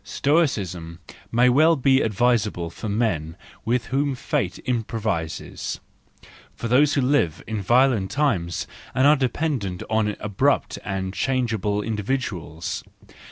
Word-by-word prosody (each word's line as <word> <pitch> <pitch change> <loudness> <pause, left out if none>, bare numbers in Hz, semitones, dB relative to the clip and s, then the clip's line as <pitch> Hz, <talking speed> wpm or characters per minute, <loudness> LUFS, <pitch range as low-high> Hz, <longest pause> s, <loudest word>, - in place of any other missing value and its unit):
Stoicism 100 - 0 0.3
may 120 +2 +4
be 125 - +4
quite 140 -2 +4
advisable 105 -6 +1
for 110 - -6
men 95 -7 -1 0.3
with 120 +1 0
whom 140 0 +1
fate 100 -5 -2
improvises, 110 -9 -3 0.8
for 115 - -4
thpse 140 +5 +4
who 140 - +2
live 125 - +1
in 110 -2 -3
violent 120 -2 +3
times 100 - 0 0.3
and 130 - +3
are 150 +1 +7
dependent 130 - -1
on 105 -2 +1
abrupt 110 +8 0
and 95 -1 -3
change¬ 130 0 0
able 105 0 -1
individuals. 105 - -3
115 Hz, 120 wpm, -23 LUFS, 95-135 Hz, 0.8 s, are